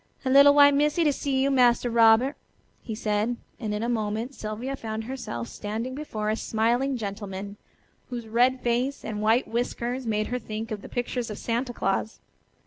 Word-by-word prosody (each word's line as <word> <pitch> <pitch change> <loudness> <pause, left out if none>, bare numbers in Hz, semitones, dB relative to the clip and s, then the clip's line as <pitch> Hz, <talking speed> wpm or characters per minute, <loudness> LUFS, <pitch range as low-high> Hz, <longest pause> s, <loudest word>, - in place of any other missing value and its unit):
"A 260 - +1
little 280 +1 +8
white 285 0 +7
missy 300 +4 +2
to 295 -2 +3
see 265 -1 0
you, 275 - +2
Massa 245 -2 +4
Robert," 235 +3 +5 0.5
he 225 - -5
said, 215 +2 -1 0.2
and 220 -4 -3
in 210 +1 -2
a - - -1
moment 225 +2 -2
Sylvia 230 +4 -4
found 220 -3 -5
herself 220 - -5
standing 220 - -5
before 220 -7 -3
a - - +1
smiling 240 +5 0
gentleman, 200 -2 -6 0.5
whose 240 -3 -5
red 250 +3 +2
face 245 +4 -1
and 210 -1 -4
white 225 +4 +3
whiskers 240 +1 -2
made 215 -1 0
her 250 0 -2
think 220 0 -6
of 210 -2 -4
the - - -10
pictures 245 -1 -3
of 210 - -6
Santa 240 +2 -2
Claus. 205 0 -2
235 Hz, 180 wpm, -26 LUFS, 215-260 Hz, 0.5 s, little